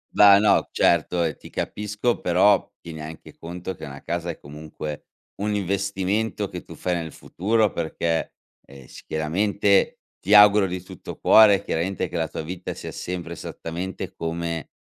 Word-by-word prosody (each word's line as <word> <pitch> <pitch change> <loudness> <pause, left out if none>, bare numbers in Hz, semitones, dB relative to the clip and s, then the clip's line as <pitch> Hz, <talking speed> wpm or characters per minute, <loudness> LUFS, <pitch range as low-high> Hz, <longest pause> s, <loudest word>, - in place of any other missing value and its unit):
Va', 100 -1 +8
no, 105 0 +3
certo, 85 +1 +2
e 80 -4 -2
ti - - -14
capisco, 105 +3 -2
però, 95 +3 +3
tieni 80 -2 -8
anche 80 +1 -10
conto 90 +2 -6
che 80 - -9
una 70 -1 -9
casa 85 0 -3
è, 85 - -5
comunque, 75 0 -8 0.4
un 105 0 0
investimento 100 +2 -1
che 90 -2 -8
tu - - -11
fai 90 -1 -1
nel 80 -3 -4
futuro 110 +2 0
perché, 80 0 -2 0.3
ehm, 70 -2 -14
s - - -13
chiaramente 100 +6 +1 0.2
ti 100 - 0
auguro 105 -1 +8
di 90 -1 -4
tutto 90 - -10
cuore 100 -3 +6
chiaramente 90 +3 -2
che 90 - -4
la 80 - 0
tua 80 - -6
vita 90 +3 -6
sia - - -8
sempre 85 -1 -5
esattamente 85 +2 -6
come, 85 -1 -4
90 Hz, 160 wpm, -24 LUFS, 80-100 Hz, 0.4 s, Va